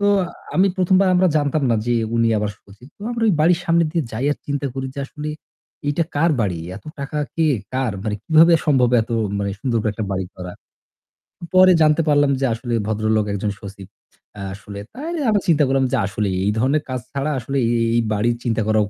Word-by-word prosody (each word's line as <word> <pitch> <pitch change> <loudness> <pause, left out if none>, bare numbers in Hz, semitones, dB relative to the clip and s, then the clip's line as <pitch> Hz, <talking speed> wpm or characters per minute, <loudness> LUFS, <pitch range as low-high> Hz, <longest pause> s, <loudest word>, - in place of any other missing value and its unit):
তো 205 - +1 0.5
আমি 195 +2 +5
১ম 185 0 +3
বার 190 - +3
আমরা 185 +1 +4
জানতাম 145 0 0
না 115 - +3
যে 120 - +1 0.2
উনি 115 0 +3
আবার 105 0 -1
সচিত। 105 +7 -17
তো - - -20
আমরা 235 -1 -2
ওই 205 - +4
বাড়ির 165 +2 +4
সামনে 170 0 +3
দিয়ে 165 -2 0
যাই 120 +5 -2
আর - - -3
চিন্তা 145 0 -1
করি 135 0 -4
যে - - -4
আসলে 150 +2 -6 0.6
এইটা 145 +4 +1
কার 165 +3 +3
বাড়ি? 95 -6 0 0.2
এত 105 - -12
টাকা 140 +2 -4 0.2
কে? 160 -1 +2 0.3
কার? 130 -3 0
মানে 105 -1 -2
কিভাবে 165 +1 +6
সম্ভব 130 -5 +3
এত 110 - -8 0.3
মানে 100 - -1
সুন্দর 120 -1 0
করে 110 - 0
একটা 110 - -4
বাড়ি 95 -1 -2
করা। 90 -1 -7 1.0
পরে 185 0 +7
জানতে 155 +1 +4
পারলাম 145 -1 +4
যে 135 - +1
আসলে 120 +1 -4
ভদ্রলোক 110 0 +1
একজন 100 +1 -2
সচিব। 100 -1 -10 0.5
অ্যা 100 - -7
আসলে। 100 0 -9
তাই 310 +6 -5 0.2
আমরা 205 -2 +2
চিন্তা 155 -3 +4
করলাম 135 0 +2
যে 135 - +2
আসলে 100 +1 -2 0.2
এই 105 - +2
ধরনের 140 +5 +1
কাজ 130 - -2
ছাড়া 140 +2 -2
আসলে 135 +4 -3
এই 115 - +1 0.2
এই 120 - +3
বাড়ির 115 +3 +1
চিন্তা 115 -2 0
করাও 110 -1 +3
135 Hz, 210 wpm, -20 LUFS, 110-155 Hz, 1.0 s, পরে